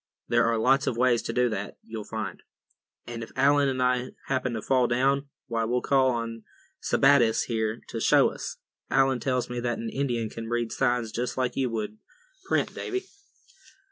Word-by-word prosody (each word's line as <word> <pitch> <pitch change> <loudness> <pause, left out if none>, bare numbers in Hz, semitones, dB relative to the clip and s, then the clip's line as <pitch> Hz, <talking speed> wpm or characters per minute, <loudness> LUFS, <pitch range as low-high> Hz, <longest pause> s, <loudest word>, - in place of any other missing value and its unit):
There 120 0 +4
are 115 0 +2
lots 135 +5 +3
of 115 - 0
ways 120 -1 +3
to - - -4
do 125 0 +2
that, 105 -2 -4
you'll 110 -2 -7
find; 110 -4 -4 0.6
and 120 -1 -6
if 115 - -8
Allan 140 +1 +4
and 130 -1 0
I 125 0 0 0.2
happen 130 -2 0
to 110 - -3
fall 130 -2 +3
down, 135 +3 +1 0.2
why, 115 -2 -1
we'll 125 +2 0
call 135 -1 +4
on 115 -2 -3 0.4
Sebattis 135 -5 +4
here 110 0 -2
to 115 - -4
show - - +5
us. - - -6 0.3
Allan 135 -1 +3
tells 125 0 0
me 125 0 -4
that 120 0 -1
an 115 - -4
Indian 120 -5 -1
can 115 0 -6
read 120 -1 -1
signs 120 -3 0
just 120 +3 -3
like 130 -1 0
you 130 -2 0
would 110 -2 -4 0.5
print, - - +1
Davy." 380 0 -3
120 Hz, 185 wpm, -27 LUFS, 115-130 Hz, 0.6 s, show